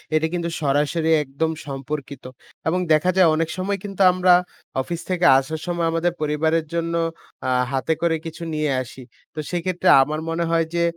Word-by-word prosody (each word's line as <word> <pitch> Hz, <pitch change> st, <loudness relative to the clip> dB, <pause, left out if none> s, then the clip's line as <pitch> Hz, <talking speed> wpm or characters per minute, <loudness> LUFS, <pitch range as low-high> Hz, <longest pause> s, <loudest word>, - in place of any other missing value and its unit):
এটা 155 Hz, +1 st, +2 dB
কিন্তু 170 Hz, -1 st, -2 dB
সরাসরি 150 Hz, +3 st, +1 dB
একদম 145 Hz, +4 st, -2 dB, 0.2 s
সম্পর্কিত। 140 Hz, 0 st, -6 dB, 0.4 s
এবং 175 Hz, +3 st, +1 dB
দেখা 155 Hz, +4 st, +3 dB
যায় 185 Hz, -3 st, +6 dB
অনেক 165 Hz, 0 st, -1 dB
সময় 195 Hz, +2 st, -1 dB
কিন্তু 195 Hz, -1 st, -5 dB
আমরা 180 Hz, 0 st, +4 dB, 0.5 s
অফিস 170 Hz, +5 st, -5 dB
থেকে 180 Hz, -1 st, +1 dB
আসার 155 Hz, +4 st, -5 dB
সময় 170 Hz, -1 st, 0 dB
আমাদের 165 Hz, +1 st, 0 dB
পরিবারের 155 Hz, +2 st, +1 dB
জন্য 170 Hz, 0 st, -1 dB, 0.5 s
আ -, -, +1 dB, 0.2 s
হাতে 135 Hz, +4 st, 0 dB
করে 170 Hz, -1 st, +2 dB
কিছু 165 Hz, +1 st, -7 dB
নিয়ে 150 Hz, -1 st, 0 dB
আসি। 130 Hz, +1 st, -10 dB, 0.3 s
তো 155 Hz, -, -7 dB
সেক্ষেত্রে 180 Hz, +1 st, -2 dB, 0.2 s
আমার 155 Hz, +3 st, -3 dB
মনে 165 Hz, +1 st, -1 dB
হয় 165 Hz, -1 st, +2 dB
যে 170 Hz, -, +2 dB
165 Hz, 170 wpm, -22 LUFS, 150-170 Hz, 0.5 s, যায়